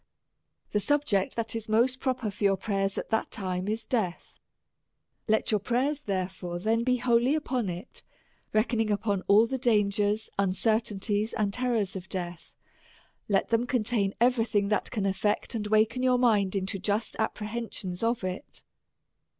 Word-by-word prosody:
The 210 - +2
subject 255 -6 +1
that 230 -1 -2
is 220 -1 -4
most 245 +4 +2
pro 260 -1 0
per 220 -4 -4
for 200 - -7
your 195 -1 +4
prayers, 195 0 -1
at - - -4
that 220 - +1
time, 185 -1 -3
is 220 +1 -2
death. 210 -9 -2 0.9
Let 220 +1 +2
your 210 - +3
prayers, 260 +7 0
therefore, 185 -4 -3
then 225 +5 +1
be 250 +1 +2
wholly 240 +3 +3
upon 255 -8 -1
it, 180 +7 -7 0.5
reck 215 +3 +2
oning 225 -3 0
up 205 +1 -1 0.2
all 210 +3 +6
the 265 +3 -3
dangers, 210 -2 +2
uncertainties, 205 +1 +1
and 205 -2 0
terrors 235 -6 0
of 185 -1 -7
death; 175 -2 -6 0.7
let 195 -2 +2
them 235 +1 +1
contain 220 -5 0
every 240 -1 +3
thing 205 -3 0
that 210 - 0
can 210 - -2
aflect 195 +2 0
and 215 -2 -2
awaken 220 +3 +2
your 255 -1 +3
mind 210 -6 +3
into 195 +1 -2
just 205 +3 -1
apprehensions 215 -4 -3
of 230 -1 0
it. 185 +8 -5
215 Hz, 160 wpm, -28 LUFS, 195-235 Hz, 0.9 s, all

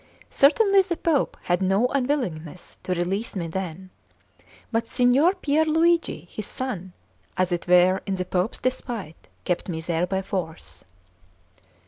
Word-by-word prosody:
Certainly 395 +7 +5
the 360 -3 -3
Pope 315 -5 0
had 175 +1 0
no 195 +5 +2
unwillingness 245 - -3
to 185 - -2
release 190 +7 -2
me 175 -3 -2
then; 185 +1 -5 0.8
but 230 0 0
Signor 260 +10 +3
Pier 310 -4 +1
Luigi, 320 - +1
his 215 -2 -5
son, 195 -9 -5 0.4
as 185 0 +1
it 175 0 -2
were 180 +1 +5
in 195 - 0
the 185 -1 -3
Pope's 185 +4 -1
despite, 235 -9 -4 0.2
kept 180 +1 -1
me 160 -2 -3
there 170 +1 -1
by 190 +1 -1
force. 180 -4 -5
195 Hz, 140 wpm, -24 LUFS, 180-275 Hz, 0.8 s, Certainly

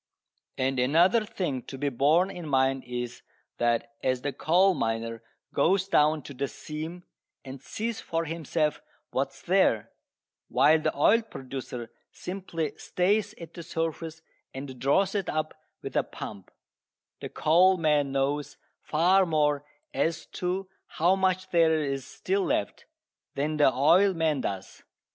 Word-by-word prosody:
And 130 0 0
another 170 - +4
thing 150 -11 -3
to 135 - -7
be 145 +1 0
borne 155 +9 +3
in 175 -4 -7
mind 135 -1 +2
is 125 -1 -5 0.4
that 120 +3 +1
as 130 -1 0
the 145 - -2
coal 180 +8 +3
miner 115 -4 -2 0.3
goes 190 +2 +2
down 150 -4 +3
to 140 - -9
the 140 +2 -2
seam 160 +6 -7 0.4
and 130 0 -8
sees 225 +9 -4
for 165 0 -2
himself 155 -1 -1 0.3
what 135 +1 0
is 135 - -19
there, 175 - +2 0.6
while 155 +3 +4
the - - -1
oil 220 +10 +5
producer 130 - -7 0.2
simply 180 -5 -4
stays 205 +3 0
at 165 -1 -10
the 170 - -8
surface 165 -1 -4 0.3
and 135 -2 -7
draws 185 +9 +2
it 200 -3 -1
up 155 0 -2 0.3
with - - -6
a - - +4
pump, 100 -3 -9 0.7
the - - -6
coal 180 +4 +4
man 150 -4 +2
knows 140 +2 -1 0.2
far 180 +5 +3
more 150 -3 +1 0.3
as 160 +4 -1 0.2
to 185 +2 -1 0.2
how 175 +4 +2
much 185 -1 0
there 165 -2 +4
is 135 -3 -3
still 195 +1 -1
left 100 - -2 0.5
than 150 +2 -1
the 145 -3 +5
oil 180 +9 +4
man 160 -4 +1
does. 95 -4 -5
155 Hz, 145 wpm, -27 LUFS, 135-180 Hz, 0.7 s, oil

